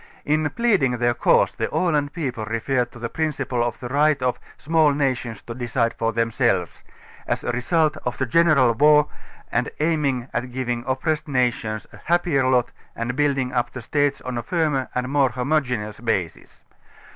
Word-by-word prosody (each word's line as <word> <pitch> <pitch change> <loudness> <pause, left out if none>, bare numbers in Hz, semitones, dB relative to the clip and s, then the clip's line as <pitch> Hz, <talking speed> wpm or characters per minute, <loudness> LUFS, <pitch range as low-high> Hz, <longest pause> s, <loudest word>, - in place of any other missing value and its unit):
In 155 0 +1
pleading 165 - +1
their 120 0 +2
cause - - +3
the - - -3
Aland 150 -5 +1
people 130 -9 -4
refer 120 +3 0
to 120 - -16
the 120 -1 -4
principle 135 -5 -1
of 120 -1 -3
the 125 - -6
right 145 +3 +2
of 125 -1 -1 0.2
,.small 155 -1 +2
nations 125 -6 -2
to 120 - -7
decide 120 -1 -1
for 115 0 -1
themselves", 115 -5 0 0.5
a - - -1
result 155 +5 +1
of 125 -4 -4
the 130 - 0
general 140 -2 +4
war 150 +4 +5 0.5
and - - 0
aiming 150 -6 0
at 125 +1 -3
giving 120 -1 -2
16 125 +2 -2
oppressed 155 +4 -1
nations 120 -5 -1
a - - -11
happier 170 -6 +2
lot 125 -2 +2 0.2
and 120 +2 -3
building 135 -3 0
up 120 -2 0
the 125 - -8
states 145 +3 0
on 125 -1 -4
a - - -2
firmer 150 -2 0
and 125 0 -1
more 140 -1 +2
homogeneons 125 -5 -2
basis. 95 -8 -3
130 Hz, 170 wpm, -23 LUFS, 120-150 Hz, 0.5 s, war